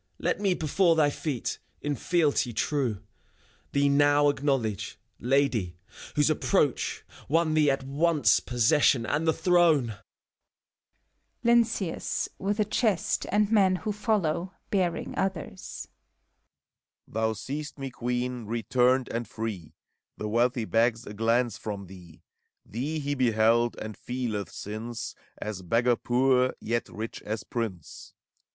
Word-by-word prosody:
Let -, -, -1 dB
me, 195 Hz, -3 st, +2 dB
before 165 Hz, +2 st, +2 dB
thy 150 Hz, -2 st, +3 dB
feet, 140 Hz, -6 st, -3 dB, 0.2 s
in 145 Hz, -, -2 dB
fealty 145 Hz, -4 st, +1 dB
true. 120 Hz, -7 st, -1 dB, 0.7 s
Thee 140 Hz, 0 st, +2 dB
now 145 Hz, +1 st, +4 dB
acknowledge, 135 Hz, -8 st, -1 dB, 0.2 s
Lady, 120 Hz, -, +1 dB, 0.4 s
whose 150 Hz, -, +3 dB
approach 155 Hz, -4 st, 0 dB, 0.3 s
Won 165 Hz, +1 st, +2 dB
thee 155 Hz, -2 st, +4 dB
at 135 Hz, -1 st, 0 dB
once 150 Hz, +3 st, +3 dB
possession 125 Hz, 0 st, +3 dB
and 150 Hz, +7 st, -1 dB
the -, -, +6 dB
throne! 160 Hz, -, +3 dB, 1.4 s
LYNCEUS 230 Hz, -7 st, +1 dB
(vnth 200 Hz, +2 st, -1 dB
a 210 Hz, -, +3 dB
chest, 215 Hz, -3 st, 0 dB
and 210 Hz, +1 st, +2 dB
men 195 Hz, -4 st, +4 dB
who 210 Hz, +4 st, -3 dB
follow, 195 Hz, -4 st, 0 dB, 0.2 s
bearing 180 Hz, -4 st, 0 dB
others). 185 Hz, -, -4 dB, 1.2 s
Thou 110 Hz, 0 st, 0 dB
seest 145 Hz, +8 st, -6 dB
me, 135 Hz, -1 st, -5 dB
Queen, 125 Hz, -1 st, -3 dB
returned 125 Hz, +3 st, +2 dB
and 115 Hz, 0 st, -3 dB
free! 105 Hz, -8 st, -6 dB, 0.4 s
The 105 Hz, -, -4 dB
wealthy 120 Hz, +2 st, +1 dB
begs 115 Hz, +1 st, +1 dB
a 105 Hz, -, -8 dB
glance 115 Hz, +3 st, +1 dB
from 100 Hz, -2 st, -5 dB
thee: 85 Hz, -3 st, -14 dB, 0.4 s
Thee 135 Hz, +9 st, -3 dB
he 145 Hz, -1 st, -2 dB
beheld, 120 Hz, -2 st, +3 dB
and 110 Hz, -1 st, -6 dB
feeleth, 120 Hz, -5 st, -3 dB
since. 110 Hz, +3 st, -6 dB, 0.2 s
As 105 Hz, -3 st, -5 dB
beggar 120 Hz, +7 st, +2 dB
poor, 130 Hz, +1 st, +2 dB
yet 115 Hz, +1 st, -2 dB
rich 110 Hz, +2 st, -6 dB
as 110 Hz, +1 st, -4 dB
prince. 105 Hz, -9 st, -6 dB
130 Hz, 125 wpm, -27 LUFS, 115-155 Hz, 1.4 s, the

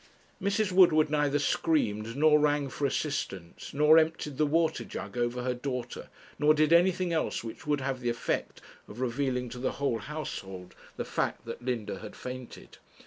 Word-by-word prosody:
Mrs. 200 Hz, 0 st, +1 dB
Woodward 155 Hz, -5 st, +5 dB
neither 145 Hz, -1 st, +2 dB
screamed, 115 Hz, -8 st, 0 dB
nor 150 Hz, +1 st, +5 dB
rang 145 Hz, -1 st, +1 dB
for 140 Hz, +2 st, -1 dB
assistance, 100 Hz, -, -4 dB
nor 150 Hz, +3 st, +6 dB
emptied 155 Hz, -3 st, -1 dB
the 155 Hz, -, +3 dB
water 160 Hz, +1 st, +1 dB
jug 100 Hz, +2 st, -7 dB
over 120 Hz, 0 st, -1 dB
her 125 Hz, 0 st, 0 dB
daughter, 125 Hz, -1 st, -5 dB, 0.3 s
nor 150 Hz, +1 st, +5 dB
did 155 Hz, +1 st, +3 dB
anything 180 Hz, 0 st, +3 dB
else 160 Hz, -, -1 dB
which 115 Hz, +5 st, -8 dB
would 145 Hz, -2 st, +1 dB
have 130 Hz, 0 st, -2 dB
the 120 Hz, -1 st, -1 dB
effect 120 Hz, -1 st, -2 dB, 0.3 s
of 105 Hz, -, -10 dB
revealing 125 Hz, 0 st, -1 dB
to 125 Hz, +1 st, -8 dB
the 130 Hz, -, -1 dB
whole 140 Hz, -5 st, -1 dB
household 95 Hz, -10 st, -6 dB, 0.2 s
the -, -, -3 dB
fact -, -, -2 dB
that 115 Hz, +1 st, -7 dB
Linda 115 Hz, -6 st, -3 dB
had 105 Hz, -, -9 dB
fainted. 125 Hz, -1 st, -9 dB
140 Hz, 170 wpm, -29 LUFS, 120-155 Hz, 0.3 s, nor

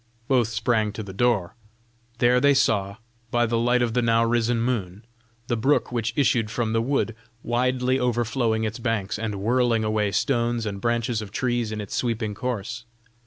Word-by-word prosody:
Both 125 Hz, -5 st, +3 dB
sprang 110 Hz, -1 st, 0 dB
to 110 Hz, -, -5 dB
the 95 Hz, -1 st, -9 dB
door. 105 Hz, -5 st, +1 dB, 0.6 s
There 125 Hz, +1 st, +4 dB
they 140 Hz, 0 st, +5 dB
saw, 100 Hz, -7 st, +1 dB, 0.3 s
by 120 Hz, 0 st, +2 dB
the 115 Hz, 0 st, 0 dB
light 120 Hz, +1 st, +2 dB
of 115 Hz, -2 st, -1 dB
the 125 Hz, -, +2 dB
now 115 Hz, 0 st, +3 dB
risen 120 Hz, 0 st, +1 dB
moon, 110 Hz, -4 st, -2 dB, 0.4 s
the 120 Hz, -, -1 dB
brook 135 Hz, +6 st, +1 dB
which 115 Hz, -2 st, -1 dB
issued 120 Hz, -6 st, +2 dB
from 110 Hz, 0 st, -1 dB
the 115 Hz, -, +2 dB
wood, 120 Hz, -2 st, 0 dB, 0.3 s
widely 125 Hz, +2 st, +1 dB
overflowing 120 Hz, -2 st, 0 dB
its 110 Hz, +2 st, -3 dB
banks, 115 Hz, -4 st, -2 dB
and 110 Hz, -2 st, -3 dB
whirling 115 Hz, +2 st, +1 dB
away 105 Hz, -1 st, 0 dB
stones 120 Hz, +2 st, 0 dB
and 100 Hz, -2 st, -4 dB
branches 115 Hz, -1 st, 0 dB
of 105 Hz, -, -7 dB
trees 120 Hz, 0 st, -1 dB
in 110 Hz, -, -4 dB
its 105 Hz, -2 st, -6 dB
sweeping 115 Hz, -3 st, -1 dB
course. 115 Hz, 0 st, -4 dB
115 Hz, 175 wpm, -24 LUFS, 110-120 Hz, 0.6 s, they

